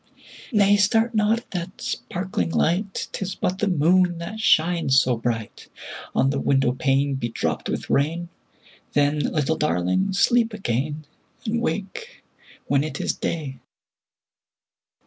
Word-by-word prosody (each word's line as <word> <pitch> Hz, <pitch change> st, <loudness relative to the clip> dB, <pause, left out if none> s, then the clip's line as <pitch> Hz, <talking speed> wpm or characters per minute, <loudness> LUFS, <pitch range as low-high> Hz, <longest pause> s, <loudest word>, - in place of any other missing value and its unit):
10 225 Hz, -, -1 dB
Nay! 205 Hz, 0 st, +5 dB
start 225 Hz, +3 st, +2 dB
not 215 Hz, +1 st, +3 dB
at 235 Hz, -, -11 dB
that 180 Hz, +1 st, -5 dB
sparkling 185 Hz, -3 st, -3 dB
light; 190 Hz, +5 st, 0 dB
'Tis 195 Hz, -1 st, -4 dB
but 185 Hz, +1 st, -2 dB
the 210 Hz, -, +1 dB
moon 180 Hz, +1 st, +3 dB
that 170 Hz, +6 st, -6 dB
shines 165 Hz, -8 st, +3 dB
so 125 Hz, -1 st, +1 dB
bright 115 Hz, -2 st, -4 dB, 0.5 s
On 135 Hz, -, +3 dB
the 140 Hz, -, -1 dB
window 135 Hz, -3 st, +2 dB
pane 135 Hz, +2 st, +1 dB
bedropped 120 Hz, -3 st, -2 dB
with -, -, -3 dB
rain: 165 Hz, +5 st, 0 dB, 0.6 s
Then, 145 Hz, +1 st, +2 dB
little 155 Hz, +1 st, 0 dB
Darling! 150 Hz, -, +1 dB
sleep 230 Hz, +3 st, +3 dB
again, 150 Hz, -, -2 dB, 0.4 s
And 230 Hz, +1 st, -1 dB
wake 210 Hz, -, -4 dB, 0.4 s
when 140 Hz, 0 st, +2 dB
it 155 Hz, -, -5 dB
is -, -, 0 dB
day. 140 Hz, -6 st, -4 dB
170 Hz, 135 wpm, -23 LUFS, 140-200 Hz, 0.6 s, Nay